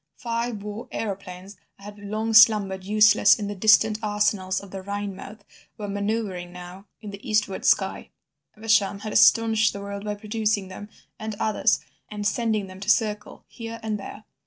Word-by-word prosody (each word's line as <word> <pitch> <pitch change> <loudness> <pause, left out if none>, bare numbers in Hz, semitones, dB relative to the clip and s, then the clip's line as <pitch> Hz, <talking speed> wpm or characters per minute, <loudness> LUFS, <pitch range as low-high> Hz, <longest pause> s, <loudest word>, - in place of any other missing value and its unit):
Five 230 -3 -3
war 210 +2 -7
aeroplanes 195 -2 -6 0.2
that 200 - -19
had 205 0 -10
long 215 +2 -3
slumbered 210 -4 +5
useless 210 0 +5
in 210 - -4
the 205 - -4
distant 215 +2 +4
arsenals 205 -3 0
of 200 -2 -13
the 195 - -6
Rhinemouth 200 +1 -6 0.4
were 210 - -5
manoeuvring 200 -3 -3
now 180 +3 -11
in 210 - -8
the 200 +5 -10
eastward 210 -2 0
sky. - - +1 0.5
Evesham 210 -2 +1
had 215 0 -5
astonished 225 -1 +4
the 200 - -6
world 200 0 -6
by 210 0 -3
producing 210 -2 -2
them 205 +2 -9 0.3
and 220 0 -5
others, 215 - +1 0.3
and 210 -1 -6
sending 220 -1 0
them 185 0 -12
to 200 +2 -5
circle 210 -1 0
here 230 -1 -8
and 215 -1 -2
there. 205 +2 -9
210 Hz, 165 wpm, -24 LUFS, 200-220 Hz, 0.5 s, slumbered